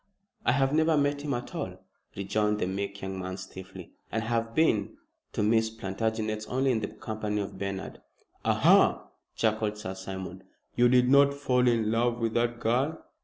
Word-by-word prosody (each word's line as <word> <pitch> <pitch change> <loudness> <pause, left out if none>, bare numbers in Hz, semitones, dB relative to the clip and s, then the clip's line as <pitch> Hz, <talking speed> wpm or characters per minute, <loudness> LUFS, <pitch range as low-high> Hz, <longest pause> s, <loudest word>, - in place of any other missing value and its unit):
"I - - +5
have 135 0 +2
never 160 0 +3
met 145 0 +1
him 145 -2 -1
at 120 - -6
all," - - -4 0.4
rejoined 105 +2 0
the 105 - 0
meek 100 +1 -4
young 95 0 -4
man 95 0 -4
stiffly, 95 -1 -10 0.2
"and 110 0 -1
I - - -5
have 115 0 -1
been 155 -10 +2 0.4
to - - 0
Miss 110 +1 +3
Plantagenet's 110 +1 -3
only 130 +2 +1
in 115 - +1
the 105 - -3
company 105 -1 -4
of 100 - -5
Bernard." 100 -1 -5 0.4
"Aha!" - - +4 0.3
chuckled 110 -1 0
Sir 95 -3 -5
Simon. 95 -1 -7 0.3
"You 120 0 +5
did 125 0 +5
not 140 +1 +5
fall 125 -3 +2
in 115 -3 +2
love 120 +1 +1
with 115 -2 -1
that 120 0 0
girl?" 130 +8 0
110 Hz, 175 wpm, -28 LUFS, 100-125 Hz, 0.4 s, I